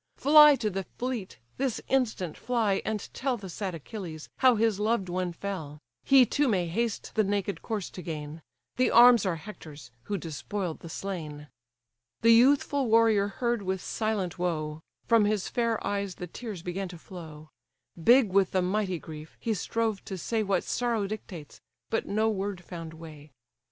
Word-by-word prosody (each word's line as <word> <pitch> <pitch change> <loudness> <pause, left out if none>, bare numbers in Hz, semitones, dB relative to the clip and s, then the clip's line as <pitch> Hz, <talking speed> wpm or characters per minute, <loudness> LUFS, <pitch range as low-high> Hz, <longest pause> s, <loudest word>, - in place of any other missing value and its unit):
Fly 300 0 +8
to 215 -5 -2
the 195 0 -3
fleet, 245 - -4 0.2
this 260 -4 -1
instant 220 - 0
fly, 225 -5 0
and 215 -2 -3
tell 260 -1 -1
The 195 -3 -9
sad 185 0 -4
Achilles, 165 -1 -8
how 255 -2 +5
his 220 -2 +1
loved 210 -3 0
one 180 0 -1
fell: 170 -5 -6 0.3
He 270 -2 +6
too 285 +5 +1
may 190 -7 +1
haste 220 +6 -2
the 220 - +3
naked 200 -3 -2
corse 210 -4 -4
to 180 - -8
gain: 155 -1 -6 0.4
The 255 - +3
arms 240 -3 +7
are 180 - 0
Hector's, 160 - -11
who 205 - -2
despoil'd 170 +2 -4
the 165 - -10
slain." 155 -6 -6 0.7
The 230 - +6
youthful 270 +3 +4
warrior 220 -3 +4
heard 235 +2 -1
with 190 -1 -2
silent 195 -4 -2
woe, 155 -3 -2 0.2
From 230 -3 +4
his 205 -2 0
fair 230 -2 0
eyes 200 -2 -2
the 180 - -6
tears 195 0 -7
began 185 +2 -3
to 175 -1 -10
flow: 160 -3 -11 0.5
Big 240 -3 +5
with 195 -2 +3
the 185 -1 +2
mighty 185 -1 0
grief, 155 -1 -10
he 225 - -1
strove 220 +1 -2
to 190 - -5
say 225 +5 -1
What 195 -3 0
sorrow 235 -4 -1
dictates, 190 -7 -8 0.3
but 225 - -1
no 215 +2 +1
word 200 -3 -2
found 165 -2 -8
way. 155 -2 -12
200 Hz, 170 wpm, -28 LUFS, 175-225 Hz, 0.7 s, Fly